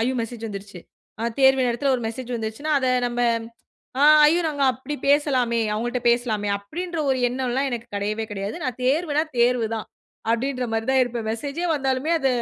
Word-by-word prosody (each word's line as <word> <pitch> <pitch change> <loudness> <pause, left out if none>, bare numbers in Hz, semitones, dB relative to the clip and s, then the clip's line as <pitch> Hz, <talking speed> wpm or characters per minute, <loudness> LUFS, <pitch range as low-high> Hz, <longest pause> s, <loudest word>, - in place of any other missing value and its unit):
ஐயோ! 260 +2 0
மெசேஜ் 230 0 -6
வந்துருச்சு, 200 -2 -8 0.4
ஆ - - -2 0.2
தேர்வு 265 -1 +5
நேரத்தில 255 +3 +1
1 240 - -6
மெசேஜ் 245 +2 -7
வந்துருச்சனா 225 +7 -3
அத 260 - -1 0.2
நம்ம, 240 0 -3 0.8
ஆ - - +4 0.2
ஐயோ! 335 +3 +3
நாங்க 285 -2 -2
அப்டி 275 +4 -6
பேசலாமே, 260 -5 +2
அவங்கள்ட்ட 240 +3 -2
பேசலாமே, 220 -4 0
அப்டின்ற 335 - -5
1 260 - +1
எண்ணம்லாம் 260 +2 -1
எனக்கு 240 0 -5
கிடையவே 215 +2 -2
கிடையாது, 200 +1 -4
நான் 255 -2 -3
தேர்வுனா, 300 +2 +1
தேர்வு 240 -2 +3
தான் 215 - -6 0.4
அப்டின்ற 250 +1 -1
மாரி 225 0 -1
தான் 260 -1 +5
இருப்பேன், 235 -2 -4
மெசேஜ்யே 285 +9 -3
வந்தாலுமே 270 +3 0
அத 270 - +1
250 Hz, 170 wpm, -23 LUFS, 225-275 Hz, 0.8 s, தேர்வு